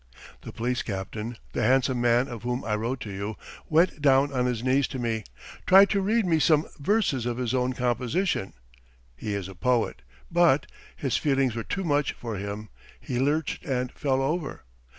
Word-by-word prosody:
The - - -8
police 120 +2 -1
captain, 105 +3 -5 0.2
the - - -1
handsome 130 +1 +2
man 120 +2 +3
of 120 -5 -7
whom 125 +2 -3
I 110 - -1
wrote 120 +5 -3
to 105 - -6
you, 100 +2 -4 0.3
went 160 -1 +3
down 140 0 +4
on 125 -1 +1
his 120 -2 -2
knees 130 +2 +2
to - - -6
me, 115 -3 -2 0.4
tried 195 +2 +7
to 200 -2 +2
read 215 +3 +2
me 165 -3 +2
some 155 -1 +4
verses 145 - +1
of 120 -1 -2
his 125 -1 -1
own 130 0 +1
composition 125 - -1 0.6
(he 105 - -4
is 100 -2 -4
a 95 - -9
poet), 120 +5 0 0.3
but... 170 -5 +4 0.3
his 135 -4 -1
feelings 135 -4 +1
were 115 - -2
too 195 - -3
much 145 -4 +1
for 115 -4 -6
him, 100 +2 -5 0.3
he 125 - -3
lurched 145 +4 0
and 125 -5 -2
fell 135 -2 0
over 155 - -2
125 Hz, 185 wpm, -26 LUFS, 115-145 Hz, 0.6 s, tried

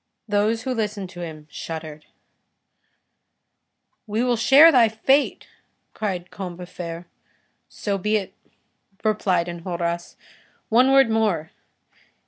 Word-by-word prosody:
Those 215 +2 +1
who 260 0 -2
listened 210 -5 -3
to 175 - -11
him 155 -3 -8
shuddered. 155 -2 -7 2.0
"We 215 +3 -1
will 245 -1 +2
share 280 +8 +7
thy 240 -6 +5
fate," 265 +6 +1 0.5
cried 185 -5 -4
Combeferre. 175 -2 -7 0.6
"So 200 -2 -3
be 210 +3 0
it," 200 -3 -2 0.7
replied 200 -5 +1
Enjolras. 170 0 -4 0.5
"One 250 +4 +4
word 270 -4 +5
more. 205 -8 0
205 Hz, 105 wpm, -23 LUFS, 175-225 Hz, 2.0 s, share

